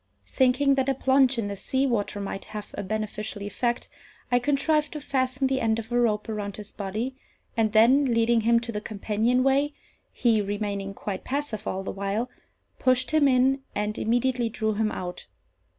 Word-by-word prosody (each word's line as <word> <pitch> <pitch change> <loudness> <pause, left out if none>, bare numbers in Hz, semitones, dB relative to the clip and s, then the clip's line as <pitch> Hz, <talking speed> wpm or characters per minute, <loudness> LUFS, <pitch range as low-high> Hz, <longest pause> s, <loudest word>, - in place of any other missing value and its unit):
Thinking 265 +2 +3
that 270 0 +1
a 270 - +1
plunge 265 0 +3
in 225 -3 -1
the 200 - -4
sea 260 +7 0
water 210 -5 -1
might 195 0 -5
have 210 -1 -8
a - - -3
beneficial 215 0 -4
effect, 240 +4 -2 0.4
I 245 - +5
contrived 295 +3 +1
to 305 - -4
fasten 260 -1 0
the 265 0 +1
end 225 -1 +2
of 230 +1 -6
a 240 - +2
rope 210 -3 +1
around 205 -3 -4
his 210 -1 -8
body, 215 +7 -4 0.4
and 220 -2 +2
then, 240 +6 +5
leading 230 -1 +3
him 230 +1 +4
to 235 0 -5
the 210 -2 -4
companion 220 +4 0
way 280 +2 +2 0.4
(he 230 -4 +2
remaining 200 -1 -3
quite 195 -1 -5
passive 260 -6 -3
all 190 +1 -2
the - - -4
while), 200 +5 -2 0.5
pushed 255 +1 +2
him 310 -2 +4
in, 265 +1 +3
and 210 +1 -2
immediately 245 +1 +1
drew 220 -1 -1
him 215 +1 0
out. 180 -1 -6
230 Hz, 180 wpm, -26 LUFS, 210-260 Hz, 0.5 s, I